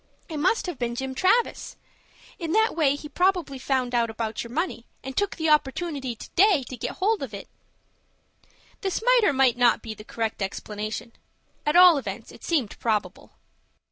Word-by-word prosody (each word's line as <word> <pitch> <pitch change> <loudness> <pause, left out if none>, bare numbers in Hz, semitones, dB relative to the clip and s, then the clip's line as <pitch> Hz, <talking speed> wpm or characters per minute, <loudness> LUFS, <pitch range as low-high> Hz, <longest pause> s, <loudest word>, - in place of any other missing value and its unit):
It 315 - -5
must 370 +10 +1
have 355 -7 -5
been 235 -1 -2
Jim 265 +1 -4
Travis. 385 - +1 0.6
In 330 -2 -3
that 440 -2 +3
way 290 -4 +3
he 295 +1 -8
probably 355 -5 0
found 255 -2 -1
out 235 -1 +2
about 220 0 -3
your 235 - -9
money, 285 -3 -3 0.2
and 265 0 -6
took 405 -1 0
the 320 -1 0
opportunity 285 -3 0
to - - -11
day 375 -6 +4
to 255 - -6
get 235 - -4
hold 415 +3 +1
of 240 -7 -5
it." 200 - -9 1.3
This 390 +2 -2
might - - +5
or 405 - +4
might 265 -3 +3
not 245 -1 +3
be 225 - -5
the 215 - -12
correct 225 -1 -4
explanation. 215 +4 -5 0.5
At 295 - +2
all 355 -4 +8
events - - -7
it - - -15
seemed 285 - -1
probable. 220 -3 -2
275 Hz, 180 wpm, -25 LUFS, 235-355 Hz, 1.3 s, all